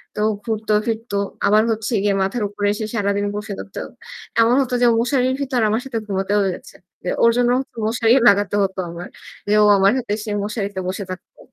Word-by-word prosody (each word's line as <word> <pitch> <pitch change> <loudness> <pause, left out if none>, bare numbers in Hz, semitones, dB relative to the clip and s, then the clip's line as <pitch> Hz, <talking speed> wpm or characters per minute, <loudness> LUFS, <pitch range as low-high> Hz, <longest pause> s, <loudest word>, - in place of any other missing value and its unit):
তো 210 - -2 0.2
ঘুরত 220 -1 -4 0.2
ফিরত। 225 -2 -4 0.3
আবার 215 +2 +4
হচ্ছে 220 +1 -2
গিয়ে 205 -1 +2
মাথার 205 +4 -2
উপরে 205 0 -2
এসে 215 +1 -4
সারাদিন 200 -1 0
বসে 210 0 -5
থাকত। 195 - -9 0.6
এমন 230 +2 +4
হতো 255 -2 -3
যে - - +5
ও - - +3
মশারির 255 +1 +1
ভিতর 260 -3 0
আমার 220 +3 0
সাথে 260 -4 -4
ঘুমাতেও 195 +1 0
হয়ে 190 -2 0
যাচ্ছে। - - -14 0.3
এ - - 0
ওর 230 - +6
জন্য 245 0 +3 0.4
মশারি 230 +1 +2 0.2
লাগাতে 205 0 +2
হত 190 -1 -2
আমার। 170 +1 -7 0.4
যে 210 - +4
ও - - +5
আমার 195 +1 +4
সাথে 245 -5 -4
এসে 215 0 -6
মশারিতে 205 -2 -3
বসে 195 +2 -4
থাকত। 185 - -10
210 Hz, 200 wpm, -20 LUFS, 200-230 Hz, 0.6 s, ওর